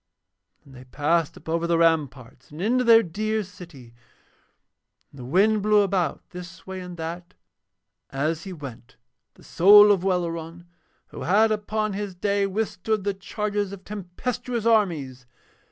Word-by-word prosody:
Then 135 - -17
they 130 0 -13
passed 150 +4 0
up 160 - -17
over 165 +1 -1
the 170 -1 +2
ramparts 140 -7 0
and 150 - -11
into 245 +7 +1
their 230 -1 +6
dear 215 +5 -2
city. 165 -10 -13 1.2
And 140 - -15
the 125 - -8
wind 200 - +2
blew 210 0 +4
about, 185 -6 -1
this 175 -1 -10
way 190 0 -6
and 180 -1 -9
that, 170 +2 -7 0.7
as 155 +4 -2
he 195 - -8
went, 135 -8 -10 0.4
the - - -19
soul 205 +4 +7
of 190 -3 +1
Welleran 170 -2 -3 0.4
who - - -10
had 215 +5 +3
upon 215 0 -2
his 200 -1 -5
day 200 +1 0
withstood 210 0 -2
the 200 0 -1
charges 205 +1 -3
of 200 -1 -10
tempestuous 220 +5 -5
armies. 155 - 0
180 Hz, 150 wpm, -24 LUFS, 165-210 Hz, 1.2 s, soul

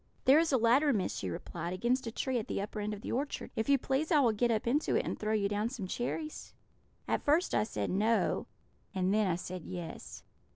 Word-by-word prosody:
"'There 275 +4 +7
is 330 -1 +2
a 265 - +4
ladder, 255 +6 +4
Miss,' 205 -7 -1
she 95 - -3
replied, 170 - -5
'against 240 +6 0
a - - -3
tree 255 +2 -1
at 215 - -6
the - - -2
upper 210 +2 -4
end 210 0 -2
of 205 -1 -6
the - - -5
orchard. 280 +4 -3
If 220 - -1
you 280 - +6
please, 270 +5 -1
I 305 - +6
will 245 -5 +4
get 235 +3 +1
up 220 -2 0
into 275 +6 +1
it - - +1
and - - -3
throw 215 0 -1
you 205 -2 +2
down 210 +2 -1
some 235 -6 -5
cherries.' 300 - -4 0.5
"At - - 0
first 310 +5 +2
I - - +3
said 220 - -3
'No,' 215 +4 +1 0.5
and 185 +1 +1
then 215 -1 +3
I 175 - +1
said 180 0 -6
'Yes.' 165 - -7
225 Hz, 240 wpm, -32 LUFS, 200-265 Hz, 0.5 s, There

